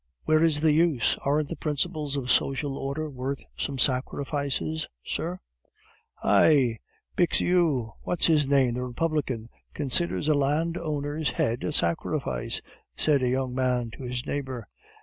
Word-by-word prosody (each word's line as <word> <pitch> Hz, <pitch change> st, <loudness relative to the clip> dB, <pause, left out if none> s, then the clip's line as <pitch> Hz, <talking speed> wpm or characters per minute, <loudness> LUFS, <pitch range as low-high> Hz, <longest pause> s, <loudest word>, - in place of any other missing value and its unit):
"Where 155 Hz, 0 st, +3 dB
is 160 Hz, -3 st, +3 dB
the 160 Hz, -1 st, +4 dB
use? 155 Hz, -5 st, +3 dB
Aren't 145 Hz, +1 st, +1 dB
the 170 Hz, -, -4 dB
principles 150 Hz, -1 st, -1 dB
of 130 Hz, -2 st, -1 dB
social 135 Hz, 0 st, +1 dB
order 140 Hz, +3 st, -3 dB
worth 135 Hz, 0 st, -4 dB
some 140 Hz, -1 st, -3 dB
sacrifices, 130 Hz, -, 0 dB, 0.2 s
sir?" 175 Hz, +3 st, -2 dB, 0.9 s
"Hi! 130 Hz, -8 st, +4 dB, 0.4 s
Bixiou! 165 Hz, -8 st, +2 dB
What's 175 Hz, -, +1 dB
his 150 Hz, -4 st, +4 dB
name, 135 Hz, -3 st, +3 dB
the 125 Hz, +1 st, -3 dB
Republican, 125 Hz, -3 st, -2 dB, 0.3 s
considers 150 Hz, +2 st, 0 dB
a 155 Hz, -, +5 dB
landowner's 150 Hz, 0 st, -1 dB
head 120 Hz, +1 st, -1 dB
a -, -, -1 dB
sacrifice!" 80 Hz, -, 0 dB, 0.3 s
said 145 Hz, -3 st, +3 dB
a 125 Hz, -, +1 dB
young 130 Hz, 0 st, -1 dB
man 125 Hz, -2 st, 0 dB
to 115 Hz, -, -11 dB
his 125 Hz, 0 st, -4 dB
neighbor. 130 Hz, -6 st, -4 dB
140 Hz, 135 wpm, -27 LUFS, 125-155 Hz, 0.9 s, a